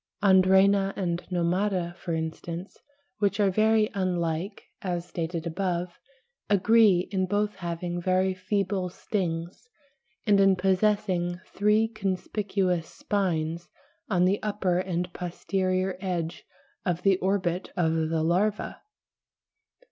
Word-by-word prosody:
Andrena 195 Hz, +1 st, +5 dB
and 175 Hz, -2 st, -1 dB
Nomada, 180 Hz, 0 st, 0 dB
for 170 Hz, -2 st, -4 dB
instance, 165 Hz, +3 st, -5 dB, 0.4 s
which 200 Hz, 0 st, +1 dB
are 200 Hz, -2 st, +4 dB
very 215 Hz, +2 st, +3 dB
unlike, 180 Hz, 0 st, -2 dB, 0.2 s
as 175 Hz, -2 st, -3 dB
stated 170 Hz, -1 st, -4 dB
above, 175 Hz, 0 st, -2 dB, 0.5 s
agree 205 Hz, -2 st, +4 dB
in 190 Hz, -2 st, 0 dB
both 205 Hz, +2 st, 0 dB
having 175 Hz, 0 st, -4 dB
very 185 Hz, +1 st, +2 dB
feeble 190 Hz, 0 st, -1 dB
stings 180 Hz, +4 st, -4 dB, 0.6 s
and 205 Hz, -2 st, +4 dB
in 195 Hz, -1 st, +5 dB
possessing 185 Hz, -2 st, +1 dB
three 210 Hz, +2 st, +3 dB
conspicuous 190 Hz, -4 st, -1 dB
spines 170 Hz, -4 st, -2 dB, 0.4 s
on 180 Hz, -3 st, +3 dB
the 195 Hz, +2 st, +1 dB
upper 195 Hz, -4 st, 0 dB
and 180 Hz, -1 st, -2 dB
posterior 185 Hz, +1 st, -1 dB
edge 175 Hz, -4 st, -3 dB, 0.4 s
of 180 Hz, -1 st, -1 dB
the 195 Hz, -2 st, +4 dB
orbit 185 Hz, -2 st, -1 dB
of 160 Hz, -2 st, +2 dB, 0.2 s
the 160 Hz, -1 st, 0 dB
larva. 200 Hz, +6 st, 0 dB
185 Hz, 110 wpm, -27 LUFS, 175-200 Hz, 0.6 s, Andrena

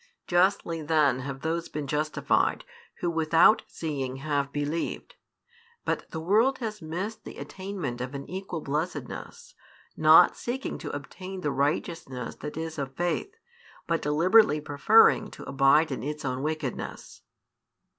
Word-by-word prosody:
Justly 175 Hz, -2 st, +2 dB
then 150 Hz, -4 st, +2 dB
have 135 Hz, +1 st, -6 dB
those 165 Hz, +1 st, -2 dB
been 150 Hz, -1 st, -4 dB
justified 150 Hz, +2 st, 0 dB, 0.4 s
who 175 Hz, -, 0 dB
without 165 Hz, +6 st, +5 dB
seeing 135 Hz, -5 st, -4 dB
have 140 Hz, 0 st, -1 dB
believed; 145 Hz, +3 st, -3 dB, 0.7 s
but -, -, -2 dB
the 160 Hz, -, -5 dB
world 220 Hz, +11 st, +3 dB
has 215 Hz, -4 st, -5 dB
missed 185 Hz, +8 st, -5 dB
the -, -, -9 dB
attainment 185 Hz, -11 st, -5 dB
of 130 Hz, +3 st, -5 dB
an 140 Hz, -, -6 dB
equal 185 Hz, -3 st, -5 dB
blessedness, 150 Hz, -2 st, -5 dB, 0.4 s
not 155 Hz, +3 st, +7 dB
seeking 260 Hz, +3 st, -4 dB
to -, -, -6 dB
obtain 185 Hz, +7 st, -7 dB
the 150 Hz, -, -1 dB
righteousness 140 Hz, -3 st, -2 dB
that 150 Hz, +1 st, -7 dB
is 160 Hz, -1 st, -4 dB
of 135 Hz, -1 st, -4 dB
faith, 175 Hz, -, -2 dB, 0.5 s
but 165 Hz, -1 st, 0 dB
deliberately 160 Hz, +3 st, +4 dB
preferring 210 Hz, +9 st, +4 dB
to -, -, -11 dB
abide 140 Hz, +3 st, +3 dB
in 130 Hz, -, -3 dB
its 150 Hz, +3 st, -5 dB
own 130 Hz, 0 st, -2 dB
wickedness. 155 Hz, -3 st, -4 dB
155 Hz, 135 wpm, -27 LUFS, 140-180 Hz, 0.7 s, not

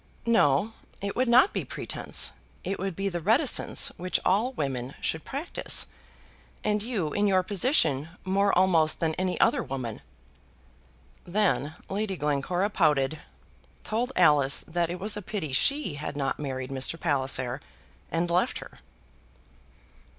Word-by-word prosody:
"No; 215 Hz, -3 st, +3 dB, 0.3 s
it 200 Hz, 0 st, -4 dB
would 255 Hz, -1 st, +1 dB
not 255 Hz, +11 st, +6 dB
be -, -, -2 dB
pretence; -, -, -1 dB, 0.3 s
it 195 Hz, +2 st, -3 dB
would 190 Hz, -1 st, -3 dB
be 195 Hz, +2 st, -2 dB
the 175 Hz, -3 st, -2 dB
reticence 230 Hz, -, +3 dB
which 180 Hz, +1 st, -1 dB
all 210 Hz, +7 st, +2 dB
women 135 Hz, -, -3 dB
should 160 Hz, -, -1 dB
practise, 290 Hz, +6 st, 0 dB, 0.8 s
and 210 Hz, -1 st, +1 dB
you, 205 Hz, -10 st, -2 dB
in 205 Hz, 0 st, +2 dB
your 190 Hz, -2 st, +3 dB
position, 175 Hz, -, +2 dB, 0.2 s
more 200 Hz, +2 st, +2 dB
almost 170 Hz, -4 st, +3 dB
than 160 Hz, -1 st, 0 dB
any 185 Hz, +2 st, -2 dB
other 240 Hz, +2 st, +3 dB
woman." 130 Hz, -, -5 dB, 1.2 s
Then 160 Hz, -7 st, 0 dB
Lady 195 Hz, -1 st, -2 dB
Glencora 160 Hz, +7 st, 0 dB
pouted, 150 Hz, -4 st, +2 dB, 0.6 s
told 235 Hz, +4 st, -2 dB
Alice 145 Hz, -5 st, +4 dB
that 170 Hz, 0 st, -1 dB
it 175 Hz, +1 st, -5 dB
was 210 Hz, +2 st, 0 dB
a 210 Hz, -, -5 dB
pity 190 Hz, -8 st, -4 dB
she 280 Hz, -, +2 dB
had 150 Hz, -, -5 dB
not 135 Hz, -2 st, -1 dB
married 130 Hz, -2 st, -4 dB
Mr. 135 Hz, +5 st, -1 dB
Palliser, 135 Hz, -3 st, 0 dB, 0.5 s
and 165 Hz, +1 st, 0 dB
left 180 Hz, +2 st, +1 dB
her. -, -, -11 dB
180 Hz, 140 wpm, -27 LUFS, 145-210 Hz, 1.2 s, not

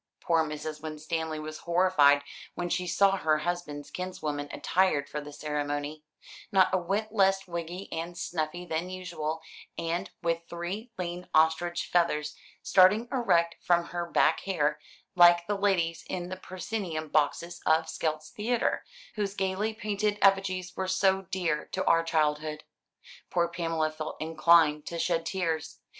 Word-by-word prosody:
Poor 165 Hz, -1 st, +2 dB
Mrs. 155 Hz, 0 st, -5 dB
Winstanley 160 Hz, +1 st, -3 dB
was 155 Hz, 0 st, -7 dB
horrified 170 Hz, -5 st, +4 dB, 0.3 s
when 175 Hz, 0 st, -3 dB
she 180 Hz, +1 st, -1 dB
saw 195 Hz, +2 st, +3 dB
her 155 Hz, -4 st, +2 dB
husband's 150 Hz, -3 st, -4 dB
kinswoman 150 Hz, -6 st, -4 dB
attired 165 Hz, -6 st, +1 dB
for 150 Hz, -, -4 dB
the 145 Hz, 0 st, -9 dB
ceremony, 145 Hz, 0 st, -3 dB, 0.5 s
not 190 Hz, -1 st, +4 dB
a -, -, +5 dB
whit 200 Hz, +5 st, -2 dB
less 195 Hz, -2 st, +3 dB
wiggy 170 Hz, +2 st, -5 dB
and 170 Hz, +2 st, -4 dB
snuffy 170 Hz, +1 st, -3 dB
than 165 Hz, +1 st, -2 dB
usual, 165 Hz, -4 st, -4 dB, 0.3 s
and 165 Hz, +1 st, -2 dB
with 165 Hz, 0 st, +1 dB
three 185 Hz, +8 st, -5 dB
lean 180 Hz, 0 st, -5 dB
ostrich 160 Hz, +2 st, +3 dB
feathers 150 Hz, -4 st, +1 dB, 0.3 s
starting 210 Hz, +5 st, +5 dB
erect 175 Hz, -10 st, +2 dB
from 170 Hz, -1 st, +2 dB
her 175 Hz, -1 st, -3 dB
back -, -, +3 dB
hair, 155 Hz, -6 st, 0 dB, 0.3 s
like 175 Hz, -1 st, +6 dB
the 205 Hz, -, -1 dB
ladies 190 Hz, -5 st, +1 dB
in 180 Hz, -1 st, -3 dB
the 185 Hz, -, -4 dB
proscenium 185 Hz, -3 st, -4 dB
boxes 155 Hz, +4 st, 0 dB
of 160 Hz, +1 st, +3 dB
Skelt's 155 Hz, -1 st, -3 dB
Theatre, 230 Hz, +3 st, 0 dB, 0.3 s
whose 205 Hz, -3 st, -2 dB
gaily 195 Hz, +3 st, 0 dB
painted 210 Hz, -1 st, -1 dB
effigies 190 Hz, -2 st, +2 dB
were 190 Hz, -, -2 dB
so 190 Hz, +1 st, +2 dB
dear 170 Hz, -5 st, -1 dB
to 190 Hz, -, -1 dB
our 165 Hz, -, +5 dB
childhood. 155 Hz, -1 st, 0 dB, 0.7 s
Poor 170 Hz, -1 st, +2 dB
Pamela 165 Hz, -2 st, -1 dB
felt 155 Hz, 0 st, -6 dB
inclined 160 Hz, -1 st, +4 dB
to 170 Hz, -, -4 dB
shed 165 Hz, -1 st, 0 dB
tears. 160 Hz, -4 st, -2 dB
170 Hz, 145 wpm, -29 LUFS, 155-185 Hz, 0.7 s, like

